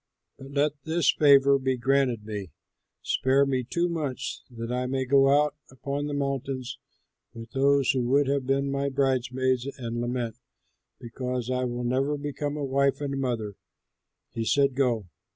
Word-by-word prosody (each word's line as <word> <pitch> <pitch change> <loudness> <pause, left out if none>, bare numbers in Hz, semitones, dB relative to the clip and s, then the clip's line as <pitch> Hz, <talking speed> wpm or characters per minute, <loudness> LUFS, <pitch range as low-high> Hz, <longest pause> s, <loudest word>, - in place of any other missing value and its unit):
But 135 - -10
let 145 +1 0
this 165 +1 +2
favor 140 -2 +5
be 130 -1 0
granted 125 -3 +1
me: 105 -4 -5 0.5
spare 135 +2 +2
me 130 -2 0
two 170 +8 -1
months 155 -7 -3
that 115 -1 -6
I 125 0 -1
may 130 0 -1
go 135 +1 +4
out 145 +1 +3 0.2
upon 140 +2 -4
the 145 - -3
mountains 135 -2 -3 0.6
with 115 0 -9
those 140 0 +3
who 130 -2 0
would 140 +2 +4
have 135 -1 -1
been 135 +1 +1
my 140 0 -1
bridesmaids 130 -1 0
and 120 -2 -4
lament 120 -2 -3 0.6
because 125 +1 -4
I 125 0 0
will 120 0 -3
never 135 +4 0
become 145 0 -4
a 145 - -2
wife 140 +1 +1
and 140 -2 -3
mother." 115 -6 -3 0.7
He 115 - -3
said, 140 +4 +2
"Go." 120 -7 0
135 Hz, 160 wpm, -27 LUFS, 125-140 Hz, 0.7 s, favor